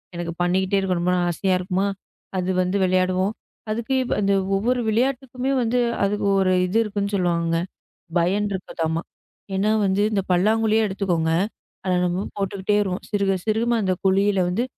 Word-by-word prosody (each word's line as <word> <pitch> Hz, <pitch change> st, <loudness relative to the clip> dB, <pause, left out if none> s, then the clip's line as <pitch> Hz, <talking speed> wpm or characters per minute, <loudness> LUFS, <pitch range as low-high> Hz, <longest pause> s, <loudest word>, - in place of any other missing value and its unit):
எனக்குப் 170 Hz, 0 st, -5 dB
பண்ணிக்கிட்டே 190 Hz, +2 st, +1 dB
இருக்கணும் 180 Hz, -2 st, -1 dB
போல 180 Hz, -, +2 dB
ஆசையா 185 Hz, +2 st, 0 dB
இருக்குமா? 185 Hz, +2 st, 0 dB, 0.5 s
அது 185 Hz, 0 st, -1 dB
வந்து 185 Hz, +2 st, 0 dB
விளையாடுவோம். 185 Hz, +2 st, +1 dB, 0.4 s
அதுக்கு 235 Hz, +4 st, -1 dB, 0.2 s
அந்த 200 Hz, -1 st, +2 dB, 0.2 s
ஒவ்வொரு 245 Hz, +5 st, +1 dB
விளையாட்டுக்குமே 255 Hz, +2 st, 0 dB
வந்து, 240 Hz, +1 st, +1 dB, 0.2 s
அது 200 Hz, +1 st, +1 dB, 0.2 s
ஒரு 185 Hz, -1 st, +3 dB
இது 185 Hz, +5 st, 0 dB
இருக்குன்னு 205 Hz, -1 st, -3 dB
சொல்லுவாங்க. 170 Hz, -3 st, +1 dB, 0.6 s
பயன் 195 Hz, +5 st, +1 dB
இருக்குதாமா? 165 Hz, -4 st, -2 dB, 0.5 s
ஏன்னா 205 Hz, +3 st, +2 dB
வந்து 190 Hz, +1 st, +1 dB
இந்தப் 195 Hz, -3 st, -1 dB
பல்லாங்குழியே 220 Hz, +4 st, +3 dB
எடுத்துக்கோங்க. 180 Hz, -5 st, 0 dB, 0.5 s
அதா 185 Hz, -1 st, +1 dB
நம்ம 180 Hz, +3 st, -1 dB
போட்டுகிட்டே 195 Hz, +1 st, 0 dB
வருவோம். 190 Hz, -3 st, -2 dB
சிறுக 200 Hz, -2 st, +1 dB
சிறுக 220 Hz, +1 st, +1 dB, 0.2 s
அந்தக் 185 Hz, -2 st, -1 dB
குழியில் 195 Hz, +1 st, +3 dB
வந்து 185 Hz, +7 st, 0 dB
195 Hz, 140 wpm, -23 LUFS, 180-210 Hz, 0.6 s, ஒரு